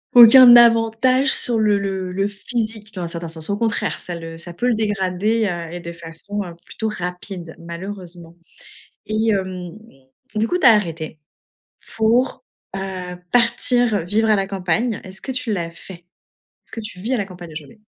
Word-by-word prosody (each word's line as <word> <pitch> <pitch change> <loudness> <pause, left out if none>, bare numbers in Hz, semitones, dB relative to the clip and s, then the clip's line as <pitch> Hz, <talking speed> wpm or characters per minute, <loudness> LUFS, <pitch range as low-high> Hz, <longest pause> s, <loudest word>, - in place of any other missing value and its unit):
«aucun 245 +1 +10
avantage» 235 +3 +5
sur 235 -2 +4
le 210 -2 +3
le 190 -2 -3
le 195 +2 0
physique 215 0 -4
dans 185 - -6
un - - -3
certain 170 0 -6
sens, 160 +1 -8
au 200 - 0
contraire 225 0 -1
ça 175 - -7
le 165 0 -8
ça 170 +1 -9
peut 240 +8 -2
le - - +3
dégrader, 210 +1 0
heu, 170 -3 -5
et 175 - -6
de 170 - -7
façon, 170 +5 -6
heu, 170 -2 -9
plutôt 220 - -5
rapide 180 -3 -6
malheureusement. 170 -1 -9 0.7
Et 215 +1 0
hem, 185 -3 -3 0.6
du 215 +1 +1
coup, 360 - -1
tu 355 - +3
as 235 - +9
arrêté 165 -6 -3 0.8
pour, 235 +4 +1 0.3
heu, 195 - -3 0.5
partir, 245 -1 +2
heu, 180 - -2
vivre 220 +5 +1
à 215 - +5
la 195 - -1
campagne, 195 +4 -1
est-ce 190 0 -10
que - - -6
tu 255 -3 -3
l'as 170 -4 -3
fait? 170 - -12 0.8
Est-ce - - -17
que - - -6
tu 205 -4 -9
vis 235 +6 -2
à - - -1
la 205 - -2
campagne 175 -3 -11
aujourd'hui? 155 +7 -10
200 Hz, 185 wpm, -20 LUFS, 175-225 Hz, 0.8 s, aucun